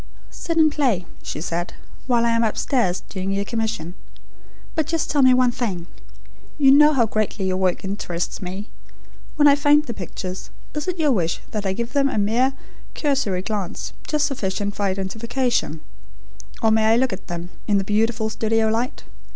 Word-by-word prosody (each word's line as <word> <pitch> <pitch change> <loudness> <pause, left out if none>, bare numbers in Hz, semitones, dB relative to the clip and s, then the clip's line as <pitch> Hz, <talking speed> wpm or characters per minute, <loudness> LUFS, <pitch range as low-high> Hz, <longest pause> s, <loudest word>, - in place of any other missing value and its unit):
"Sit 330 -1 -3
and 310 -1 +5
play," 250 -12 +1 0.2
she - - -5
said, 175 +1 -3 0.3
"while 240 -2 +3
I 235 - +3
am 230 0 +2
upstairs, 220 -3 0
doing 190 -1 -5
your 200 +1 -1
commission. 220 -7 -3 0.8
But 315 -3 0
just 325 -1 -1
tell 290 - +3
me 260 -1 +7
one 250 -1 +4
thing. 195 -9 -3 0.7
You 275 -3 +6
know 300 +2 +7
how 245 -5 +3
greatly 215 -2 -1
your 185 0 0
work 185 0 0
interests 180 -3 -3
me. 190 +3 -5 0.7
When 295 -1 +5
I 285 - +8
find 295 +1 +4
the 235 - -4
pictures, 185 -1 -6 0.2
is 300 +1 -4
it 365 -1 -1
your 305 -3 +3
wish 175 -8 0
that 210 -2 -2
I 190 - 0
give 235 +4 -4
them 280 -1 +3
a 270 - -3
mere 235 +6 +2 0.4
cursory 260 - 0
glance, 200 -4 -4
just 300 -1 +1
sufficient 205 -5 -2
for 205 - 0
identification; 220 - -1 0.8
or 220 - +4
may 220 0 +3
I 220 +1 +5
look 255 -2 +2
at 190 - -8
them, 175 0 -5 0.2
in 205 - +3
the 195 - +1
beautiful 220 +2 0
studio 220 0 +1
light? 230 +3 -2
220 Hz, 180 wpm, -22 LUFS, 190-265 Hz, 0.8 s, I